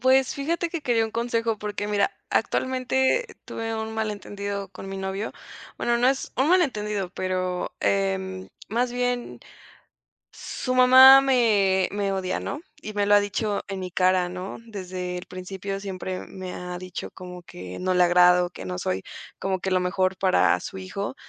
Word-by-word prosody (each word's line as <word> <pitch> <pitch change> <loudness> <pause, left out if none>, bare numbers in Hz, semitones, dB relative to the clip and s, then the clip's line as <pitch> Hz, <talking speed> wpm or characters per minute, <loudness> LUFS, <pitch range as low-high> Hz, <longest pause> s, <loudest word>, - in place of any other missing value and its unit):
Pues, 260 +1 +4
fíjate 335 +4 -1
que 335 - -3
quería 235 -5 +2
un 220 - -4
consejo 230 -1 -1
porque, 205 0 -4
mira, 210 - +1 0.2
actualmente 260 - +1 0.2
tuve 225 0 -4
un 220 0 -4
malentendido 205 -2 -4
con 195 0 -9
mi 195 - -5
novio, 190 +2 -3 0.4
bueno, 235 0 +1
no 245 +1 +4
es 270 0 -1
un 265 +4 +2
malentendido, 210 - +1
pero, 185 -1 -2
em, 190 -1 -1 0.2
más 240 +3 0
bien, 245 0 -2 0.9
su 255 - -4
mamá 260 +1 +9
me 210 -8 +3
me 200 -1 -1
odia, 185 -1 -1
¿no? 290 - -4 0.2
Y 215 - -6
me 205 -1 +1
lo 205 - +5
ha 205 - +7
dicho 205 +1 -1
en 195 -1 -4
mi 185 -1 -5
cara, 185 0 +2
¿no? 180 +2 -6
Desde 185 -4 -5
el 180 - -9
principio 190 +2 -5
siempre 185 -1 -5
me 185 -1 -7
ha 180 0 -6
dicho 185 0 -7
como 180 -1 -9
que 90 - -9
no 185 0 0
le 180 - +5
agrado, 180 0 +5
que 95 - -9
no 90 -1 -4
soy 95 +1 -2 0.4
como 190 -1 -1
que 190 - -2
lo 185 - +3
mejor 185 +1 0
para 190 -1 +3
su 190 - -7
hijo 200 +4 -5
200 Hz, 170 wpm, -25 LUFS, 185-235 Hz, 0.9 s, mamá